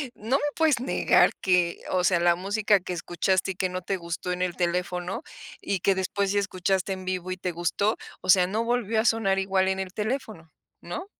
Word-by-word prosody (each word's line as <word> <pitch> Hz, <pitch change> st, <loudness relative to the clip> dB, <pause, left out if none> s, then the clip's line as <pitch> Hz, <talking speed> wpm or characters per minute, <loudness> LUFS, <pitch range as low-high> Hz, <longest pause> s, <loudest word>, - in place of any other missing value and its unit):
no 235 Hz, +6 st, 0 dB
me -, -, -5 dB
puedes 315 Hz, -5 st, +3 dB
negar 255 Hz, -, +3 dB
que, 180 Hz, -2 st, +1 dB
o 180 Hz, -1 st, +1 dB
sea, 180 Hz, -1 st, +3 dB
la 175 Hz, 0 st, +4 dB
música 200 Hz, +3 st, +2 dB
que 180 Hz, 0 st, -5 dB
escuchaste, 180 Hz, +3 st, 0 dB
y -, -, -8 dB
que 185 Hz, +1 st, -1 dB
no 185 Hz, 0 st, -4 dB
te 195 Hz, +1 st, -2 dB
gustó 170 Hz, +1 st, -5 dB
en 180 Hz, -, -3 dB
el 180 Hz, -1 st, -1 dB
teléfono, 180 Hz, +2 st, -2 dB, 0.4 s
y 195 Hz, -4 st, -2 dB
que 195 Hz, -, +3 dB
después 190 Hz, +1 st, -1 dB
sí 205 Hz, -, +2 dB
escuchaste 190 Hz, 0 st, -1 dB
en 185 Hz, -1 st, -8 dB
vivo 185 Hz, -1 st, -3 dB
y 185 Hz, -, -3 dB
te 180 Hz, -1 st, -3 dB
gustó. 175 Hz, +6 st, 0 dB, 0.3 s
O 185 Hz, -, -8 dB
sea, 180 Hz, -1 st, +6 dB
no 215 Hz, +4 st, -1 dB
volvió 230 Hz, -2 st, 0 dB
a 220 Hz, -, +1 dB
sonar 220 Hz, -5 st, +2 dB
igual 190 Hz, 0 st, +1 dB
en 190 Hz, 0 st, 0 dB
el 190 Hz, -1 st, -5 dB
teléfono, 215 Hz, -, -4 dB, 0.3 s
¿no? 370 Hz, -, -6 dB
190 Hz, 215 wpm, -26 LUFS, 180-205 Hz, 0.4 s, sea